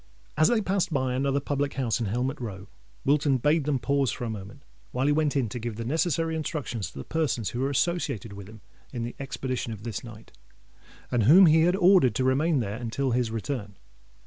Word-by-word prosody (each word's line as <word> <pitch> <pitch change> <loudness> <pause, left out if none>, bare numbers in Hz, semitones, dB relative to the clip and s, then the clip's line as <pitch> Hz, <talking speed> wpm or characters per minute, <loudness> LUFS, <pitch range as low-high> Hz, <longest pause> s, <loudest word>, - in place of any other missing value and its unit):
As 155 +1 +4
they 235 -2 +2
passed 190 -2 0
by 130 -4 0
another 135 +2 +1
public 140 0 -2
house 125 -5 0
in 115 - -1
Helmet 125 +7 -2
Row, 100 -5 -6 0.4
Wilton 140 -1 +3
bade 150 +4 +2
them 145 -2 +1
pause 140 0 +1
for - - -6
a 115 - -2
moment, 100 -2 -9 0.3
while 130 +2 -1
he 145 - +3
went 150 -1 +1
in 135 -4 +1
to 125 - -5
give 115 -1 -4
the 115 +1 -5
necessary 160 +3 0
instructions 150 - -3
to - - -14
the - - -5
persons 145 -9 -1
who 120 - -4
were 135 +2 0
associated 140 - -1
with 100 0 -10
him 110 -1 -13 0.3
in 120 -3 -4
the 120 - -4
expedition 130 -3 -3
of 105 -2 -8
this 115 -4 -5
night, 110 -2 -12 0.8
and 120 -4 +2
whom 180 - +8
he 160 0 +5
had 180 +1 +3
ordered 180 - +5
to 130 - +1
remain 140 +3 +2
there 105 -1 -3
until 125 +3 -2
his 120 -1 +1
return. 110 -3 -4
130 Hz, 215 wpm, -27 LUFS, 115-150 Hz, 0.8 s, whom